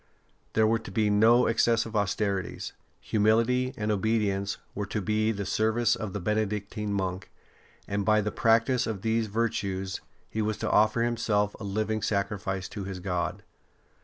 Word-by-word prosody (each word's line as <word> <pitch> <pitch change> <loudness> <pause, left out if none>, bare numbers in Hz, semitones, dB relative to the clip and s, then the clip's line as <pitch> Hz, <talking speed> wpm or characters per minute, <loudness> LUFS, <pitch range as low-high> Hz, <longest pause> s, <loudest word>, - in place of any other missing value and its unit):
There 110 - +4
were 115 +1 +2
to 110 - -10
be 105 +2 +1
no 115 +4 +5
excessive 115 0 +2
austerities; 100 -1 -1 0.3
humility 115 +4 +2
and 105 0 -1
obedience 100 -1 0 0.2
were 105 -1 -3
to 105 - -2
be 110 +2 +1
the 100 -2 -4
service 110 +4 +2
of 110 -4 -5
the 105 - -4
Benedictine 105 +1 -2
monk, 95 -2 -2 0.6
and 100 0 -1
by 110 +1 +4
the 105 +1 -2
practice 115 +3 +2
of 105 -4 -4
these 115 0 +1
virtues 100 -4 -2 0.3
he 110 - -3
was 105 0 -1
to - - -2
offer 110 +2 +4
himself 110 -3 0
a - - -7
living 110 +2 -1
sacrifice 100 -2 -1
to 100 - -6
his 95 -1 -5
God. 90 -3 -2
105 Hz, 160 wpm, -28 LUFS, 100-110 Hz, 0.6 s, no